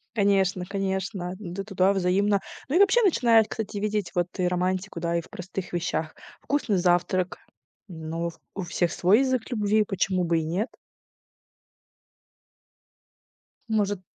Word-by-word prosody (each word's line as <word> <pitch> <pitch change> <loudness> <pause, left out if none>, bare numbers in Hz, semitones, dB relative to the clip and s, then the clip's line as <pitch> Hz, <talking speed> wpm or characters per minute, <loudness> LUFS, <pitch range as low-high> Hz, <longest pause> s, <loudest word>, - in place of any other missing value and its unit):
Конечно 195 -3 +2
конечно. 190 -1 -3
Да, 195 0 -5
туда 195 -1 +2
взаимно. 195 +2 +2 0.3
Ну, 300 - 0
и - - +5
вообще 400 +4 +5
начинаешь, 230 - +4
кстати, 215 -2 -4
видеть 210 -2 -1
вот 175 0 +1
и 180 - +2
романтику, 180 0 -1
да, 170 0 0
и - - 0
в - - -17
простых 185 0 -6
вещах. 165 -2 -2 0.3
Вкусный 260 -9 0
завтрак. 180 +1 +1 0.5
Ну, 165 0 -4 0.2
у 195 - -3
всех 170 0 0
свой 195 +7 +4
язык 260 -3 0
любви. 215 -1 +2
Почему 190 -2 0
бы 165 -1 +2
и - - -2
нет? 185 +9 -1 3.0
Может 205 -3 0
190 Hz, 135 wpm, -26 LUFS, 175-210 Hz, 3.0 s, и